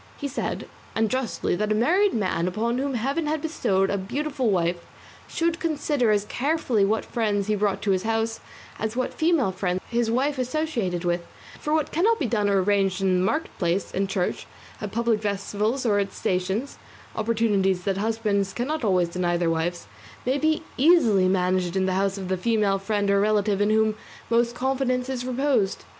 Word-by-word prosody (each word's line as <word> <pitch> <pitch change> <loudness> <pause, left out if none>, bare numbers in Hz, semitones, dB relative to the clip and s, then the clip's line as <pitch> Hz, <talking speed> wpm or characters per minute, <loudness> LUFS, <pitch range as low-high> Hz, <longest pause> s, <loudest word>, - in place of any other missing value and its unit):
He 285 - -3
said, 280 - -4 0.3
and 220 -1 +1
justly, 255 -8 -1
that 210 +3 -1
a - - +3
married 360 - +3
man 185 -5 0
upon 230 +6 -1
whom 275 -1 -1
heaven 275 +7 -1
had 310 +1 0
bestowed 195 -11 0
a 200 - 0
beautiful 270 +5 -2
wife 175 -2 0 0.4
should 335 0 -1
consider 295 -6 0
as 205 -1 +2
carefully 260 -4 0
what 215 +3 +1
friends 210 -4 0
he 215 - 0
brought 205 -1 0
to 200 - +2
his 185 -1 +2
house 225 +1 -1 0.4
as 220 +1 -2
what 255 0 -1
female 315 - +2
friends 185 -1 -1
his 235 -1 +1
wife 265 +4 0
associated 245 - -1
with, 175 0 +1 0.4
for 300 - -3
what 310 -1 +1
cannot 430 +8 +3
be 295 - -1
done 210 -3 +1
or 195 -2 +3
arranged 195 -1 +1
in 185 -1 +3
the - - +1
market 305 +12 -1
place, 180 +1 0
in 195 +1 -1
church, 190 -2 -2 0.3
at 210 -2 -4
public 230 -1 +1
festivals 210 +5 -1
or 205 -3 +3
at 195 -1 -1
stations 190 +8 -2 0.4
(opportunities 210 -5 +1
that 195 -1 -1
husbands 205 -2 0
cannot 285 +4 -2
always 180 -5 +2
deny 175 0 0
their 170 -1 +1
wives), 170 +2 -2 0.4
may 260 +3 +1
be 315 +1 +1
easily 250 - +5
managed 185 -1 +1
in 190 -1 +2
the 190 - 0
house 195 +1 0
of 190 -2 -5
the 185 0 0
female 205 -1 +1
friend 205 0 0
or 200 - +4
relative 205 -1 +2
in 205 - +3
whom 220 0 +3 0.4
most 235 +1 +2
confidence 260 -1 0
is 255 -2 -3
reposed. 255 -6 0
215 Hz, 185 wpm, -25 LUFS, 195-255 Hz, 0.4 s, easily